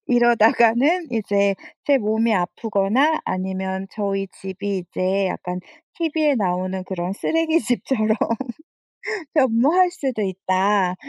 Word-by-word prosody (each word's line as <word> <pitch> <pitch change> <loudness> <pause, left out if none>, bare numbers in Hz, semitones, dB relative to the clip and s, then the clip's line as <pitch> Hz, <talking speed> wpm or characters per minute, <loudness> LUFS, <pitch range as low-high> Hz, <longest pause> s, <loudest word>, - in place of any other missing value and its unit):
이러다가는 240 +7 +4
이제 200 -3 +1 0.3
제 285 -1 +5
몸이 220 0 +1
아프거나 215 - +1
아니면 190 +1 -3
저희 195 -2 -2
집이 195 +1 -5
이제 185 +2 -1
약간 180 0 -4 0.4
티비에 315 -3 +1
나오는 185 -3 -1
그런 185 0 -4
쓰레기 325 +6 +1
집처럼 225 -4 0 1.2
변모할 290 +7 +4
수도 265 -10 -3
있다." 190 0 +1
210 Hz, 250 characters per minute, -22 LUFS, 190-260 Hz, 1.2 s, 제